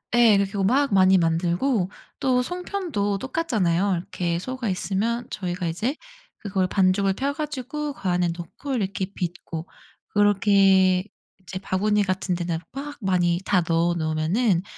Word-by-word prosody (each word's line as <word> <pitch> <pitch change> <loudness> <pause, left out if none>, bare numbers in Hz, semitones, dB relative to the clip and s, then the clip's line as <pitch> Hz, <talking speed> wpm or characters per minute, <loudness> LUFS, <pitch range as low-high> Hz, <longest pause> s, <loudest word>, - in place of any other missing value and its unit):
예. 230 -4 +6
그렇게 195 0 0
하고 200 -1 0
막 270 +7 +2
많이 190 0 +6
만들고 175 +6 +1 0.3
또 255 -2 +2
송편도 340 - -2
똑같잖아요. 205 - 0
이렇게 170 -1 -2
소가 255 +4 -4
있으면 220 +6 -1
저희가 180 -3 -3
이제 215 - -1 0.4
그걸 195 -3 -1
반죽을 195 +1 +2
펴 270 +8 -1
가지고 295 0 -4
그 195 - -4
안에 175 -1 +2
넣고 175 - -6
이렇게 195 -5 -1
빚고 170 -2 -5 0.4
그렇게 195 -2 +4 0.4
이제 185 +1 -6
바구니 205 +2 +1
같은 185 -1 -1
데다가 170 -1 -3
막 285 +2 -7
많이 175 -3 +2
다 185 -3 +3
넣어 170 +1 +2
놓으면은 170 +5 +1
195 Hz, 310 characters per minute, -24 LUFS, 180-240 Hz, 0.4 s, 예